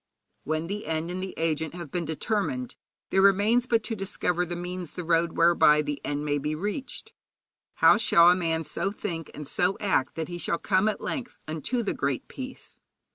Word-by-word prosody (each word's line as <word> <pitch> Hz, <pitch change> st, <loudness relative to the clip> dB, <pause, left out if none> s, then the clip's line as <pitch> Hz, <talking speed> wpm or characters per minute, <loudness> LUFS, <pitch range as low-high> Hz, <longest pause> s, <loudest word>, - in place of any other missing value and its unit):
When 155 Hz, +1 st, -1 dB
the 200 Hz, 0 st, -5 dB
end 160 Hz, +2 st, -2 dB
and 185 Hz, +1 st, -4 dB
the 190 Hz, 0 st, -5 dB
agent 160 Hz, 0 st, -1 dB
have 170 Hz, -6 st, -8 dB
been 175 Hz, -2 st, -2 dB
determined, 220 Hz, -, -2 dB, 0.4 s
there 190 Hz, -, +4 dB
remains 205 Hz, +5 st, +4 dB
but 230 Hz, -3 st, +2 dB
to 225 Hz, -, -3 dB
discover 180 Hz, -3 st, -1 dB
the 175 Hz, -, -4 dB
means, 180 Hz, -1 st, -5 dB
the 180 Hz, -, -5 dB
road 165 Hz, 0 st, +2 dB
whereby 165 Hz, -3 st, +5 dB
the 145 Hz, -1 st, -4 dB
end 145 Hz, +1 st, -2 dB
may 145 Hz, -1 st, 0 dB
be 150 Hz, +2 st, -2 dB
reached. 210 Hz, -, -5 dB, 0.6 s
How -, -, +6 dB
shall 170 Hz, +1 st, +6 dB
a -, -, +4 dB
man 165 Hz, -2 st, -1 dB
so 195 Hz, +5 st, -2 dB
think 170 Hz, -6 st, -5 dB
and 150 Hz, -2 st, -7 dB
so 180 Hz, +6 st, +1 dB
act 185 Hz, -10 st, +1 dB
that 160 Hz, -1 st, -3 dB
he 175 Hz, 0 st, -6 dB
shall 170 Hz, -, 0 dB
come 190 Hz, +3 st, +2 dB
at 215 Hz, -, -4 dB
length 245 Hz, -4 st, -4 dB
unto 160 Hz, -, -2 dB
the 205 Hz, -, -1 dB
Great 140 Hz, -2 st, -2 dB
Peace? 260 Hz, -1 st, -8 dB
175 Hz, 195 wpm, -27 LUFS, 160-200 Hz, 0.6 s, How